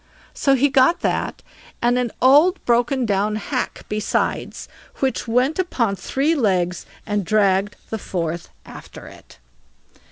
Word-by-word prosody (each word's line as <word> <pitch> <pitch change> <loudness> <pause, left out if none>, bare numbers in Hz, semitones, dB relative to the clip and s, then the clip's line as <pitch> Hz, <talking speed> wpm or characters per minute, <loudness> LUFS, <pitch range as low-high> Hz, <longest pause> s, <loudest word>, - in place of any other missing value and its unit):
So 275 -1 +2
he 275 +2 +3
got 265 +4 +3
that, - - -2 0.4
and 240 +1 +2
an 245 -1 -1
old 300 +8 +6
broken 245 +2 +1
down 205 0 0
hack 215 - -4
besides, 210 0 -2 0.3
which 265 -2 -2
went 250 +8 +1
upon 235 - 0
three 270 - 0
legs 185 - 0 0.2
and 205 -2 -1
dragged 200 0 +1 0.2
the 220 - -3
fourth 170 -3 -4 0.2
after - - -12
it. - - -15
235 Hz, 130 wpm, -21 LUFS, 200-265 Hz, 0.4 s, old